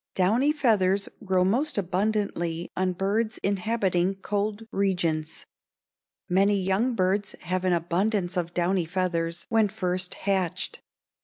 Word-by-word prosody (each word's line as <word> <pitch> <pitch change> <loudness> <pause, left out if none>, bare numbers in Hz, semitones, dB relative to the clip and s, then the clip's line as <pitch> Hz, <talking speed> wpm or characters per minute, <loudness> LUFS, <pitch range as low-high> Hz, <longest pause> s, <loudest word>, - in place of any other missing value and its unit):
Downy 225 +10 +3
feathers 200 -9 +2
grow 185 -2 +2
most 255 +10 +1
abundantly 185 -3 -1
on 185 0 0
birds 210 +5 -1
inhabiting 195 -2 +1
cold 205 +2 -2
regions. 170 -5 -1 0.8
Many 200 +2 +3
young 195 +7 +1
birds 195 +1 0
have 180 +1 -2
an 185 - +3
abundance 175 +3 0
of 175 -2 -1
downy 180 0 +1
feathers 170 -1 -1
when 225 -2 +4
first 185 -3 -2
hatched. 185 -2 -1
190 Hz, 115 wpm, -26 LUFS, 180-205 Hz, 0.8 s, when